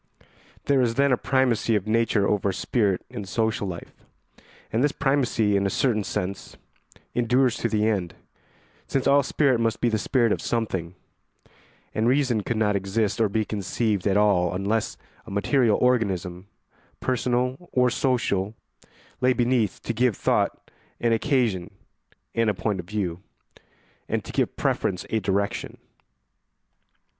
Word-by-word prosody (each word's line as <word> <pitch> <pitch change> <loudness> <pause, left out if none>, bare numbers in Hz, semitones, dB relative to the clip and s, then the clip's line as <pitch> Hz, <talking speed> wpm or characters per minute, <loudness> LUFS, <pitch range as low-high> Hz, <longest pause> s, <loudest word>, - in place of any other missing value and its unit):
There 140 -2 +3
is 115 -2 +1
then 140 0 +3
a - - +5
primacy 125 -3 +1
of 105 -2 0
nature 110 -2 +2
over 100 -1 +1
spirit 100 -2 0
in 120 -4 -7
social 110 +1 -1
life; 85 -2 -7 0.8
and 115 +4 +2
this 145 - +3
primacy, 130 -7 +1
in 100 0 +2
a - - -1
certain 110 -1 +1
sense, 95 +1 -4 0.6
endures 125 +1 +2
to 115 - -1
the 110 -1 +1
end, 95 -6 -1 0.7
since 135 -1 -1
all 140 +1 +5
spirit 135 -2 +2
must 115 -1 0
be 120 - +2
the 110 -1 0
spirit 120 0 +2
of - - 0
something, 95 -7 -2 1.0
and 110 +2 +1
reason 125 -4 +2
could 115 +3 -2
not 105 -2 +2
exist 100 +3 0
or 110 - +3
be 110 +2 0
conceived 105 0 -1
at 100 0 +3
all 90 -4 +3
unless 105 +4 -1 0.3
a - - -8
material 110 +3 +2
organism, 95 -7 0 0.5
personal 125 +5 -1
or 125 -1 +3
social, 115 -6 0 0.7
lay 130 0 +4
beneath 120 -5 0
to 115 - -2
give 120 -1 +1
thought - - 0 0.3
an 115 -1 +2
occasion 115 - +1 0.6
and 115 -1 +2
a 105 - 0
point 100 0 -2
of 85 - -7
view, 95 -5 -3 0.9
and - - -1
to - - -7
give - - 0
preference 90 - -1
a 110 - +2
direction. 100 +1 -2
110 Hz, 150 wpm, -25 LUFS, 100-125 Hz, 1.0 s, a